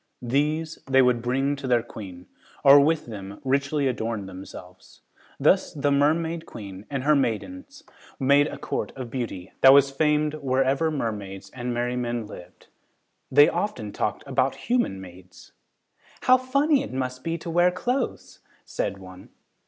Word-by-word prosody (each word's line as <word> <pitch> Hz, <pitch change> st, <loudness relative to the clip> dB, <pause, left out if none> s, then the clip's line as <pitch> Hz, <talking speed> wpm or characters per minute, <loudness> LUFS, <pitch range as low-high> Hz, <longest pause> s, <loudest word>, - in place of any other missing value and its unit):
These 150 Hz, +6 st, -1 dB
they 135 Hz, 0 st, +5 dB
would 125 Hz, -2 st, +2 dB
bring 135 Hz, +4 st, 0 dB
to 135 Hz, -1 st, -6 dB
their 120 Hz, -2 st, +2 dB
queen, 90 Hz, -4 st, -10 dB, 0.4 s
or 140 Hz, +1 st, +9 dB
with 155 Hz, +2 st, +2 dB
them 100 Hz, -3 st, -8 dB
richly 140 Hz, +1 st, 0 dB
adorn 115 Hz, -4 st, -3 dB
themselves. 90 Hz, -1 st, -12 dB, 0.4 s
Thus -, -, +2 dB
the 145 Hz, 0 st, 0 dB
Mermaid 160 Hz, +4 st, +1 dB
Queen 100 Hz, -2 st, -10 dB
and 135 Hz, -2 st, -3 dB
her 150 Hz, +2 st, +4 dB
maidens 275 Hz, -, -3 dB, 0.4 s
made 140 Hz, +2 st, +4 dB
a -, -, -7 dB
court -, -, -4 dB
of 125 Hz, -3 st, -7 dB
beauty 110 Hz, -8 st, -5 dB
that 135 Hz, 0 st, +9 dB
was 140 Hz, 0 st, +5 dB
famed 150 Hz, +1 st, +1 dB
wherever 135 Hz, +1 st, +1 dB
mermaids 100 Hz, -8 st, -5 dB
and 125 Hz, -1 st, -5 dB
merrymen 120 Hz, -1 st, -2 dB
lived. 90 Hz, -3 st, -13 dB, 0.6 s
They 145 Hz, +2 st, +7 dB
often 170 Hz, -, -3 dB
talked -, -, -3 dB
about -, -, 0 dB
human 240 Hz, -, -1 dB
maids. 90 Hz, 0 st, -14 dB, 0.7 s
"How 255 Hz, -, +6 dB
funny 275 Hz, +3 st, +2 dB
it 275 Hz, -, -6 dB
must 130 Hz, -1 st, -4 dB
be 165 Hz, 0 st, -2 dB
to 170 Hz, +1 st, -7 dB
wear 175 Hz, +2 st, +4 dB
clothes," 245 Hz, +8 st, -3 dB, 0.3 s
said 100 Hz, -, -3 dB
one. 95 Hz, -1 st, -13 dB
135 Hz, 150 wpm, -25 LUFS, 110-155 Hz, 0.7 s, or